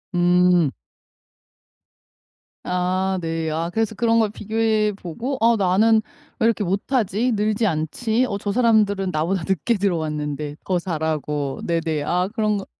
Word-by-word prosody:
음. 175 -3 +4 1.9
아 185 +1 0
네. 165 -1 -2
아 165 +2 -2
그래서 220 -1 -1
그런 230 +1 +2
걸 220 -2 +2
비교해 215 0 0
보고 215 - -5
'아 230 +1 +5
나는 215 +4 +3 0.4
왜 - - +2
이렇게 225 -2 +2
못하지 210 +4 0
늘지 215 +1 0
않지? 220 +9 0
어 200 - -3
저 205 0 -2
사람들은 210 -4 +2
나보다 165 +3 -1
늦게 190 +5 +1
들어왔는데 150 -6 -2
더 185 - +1
잘하고' 155 -4 -2
네네 165 -3 -1
아 180 +4 0
그런 215 -3 +1
거 195 - -6
190 Hz, 260 characters per minute, -22 LUFS, 165-220 Hz, 1.9 s, 아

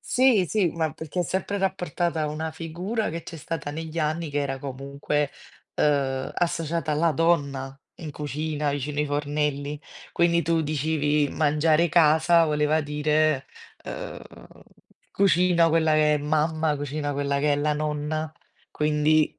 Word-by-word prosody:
Sì, 245 -8 +3
sì, 205 -5 +2
ma 160 -3 -2
perché 160 +3 -4
è - - +3
sempre 190 +4 -2
rapportata 175 -3 -1
a - - 0
una 160 +1 -3
figura 175 +8 -3
che 170 +1 -5
c'è 165 - -9
stata 150 -1 -5
negli 160 +2 -6
anni 155 0 -1
che 145 - -1
era 135 -1 -2
comunque, 140 +2 -3 0.4
uhm, 135 -3 +1
associata 165 -2 -1
alla 160 +2 +2
donna 140 -4 0 0.2
in 155 -3 -7
cucina, 150 +1 -3
vicino 145 +1 -3
i - - +1
fornelli. 145 0 -2 0.3
Quindi 170 0 +3
tu 165 0 +1
dicevi 150 -1 0
"mangiare, 155 +2 +2
casa" 165 +1 +5
voleva 150 +1 +1
dire 150 -1 +1 0.4
uhm - - -7 0.9
cucina 180 -3 +3
quella 160 -1 +2
che 150 0 +4
è 150 - 0
mamma, 155 +1 0
cucina 145 +1 -3
quella 140 0 -1
che 150 0 +2
è 145 - +2
la 150 +1 +1
nonna, 150 +1 -2 0.4
quindi 150 0 +2
155 Hz, 145 wpm, -25 LUFS, 145-165 Hz, 0.9 s, casa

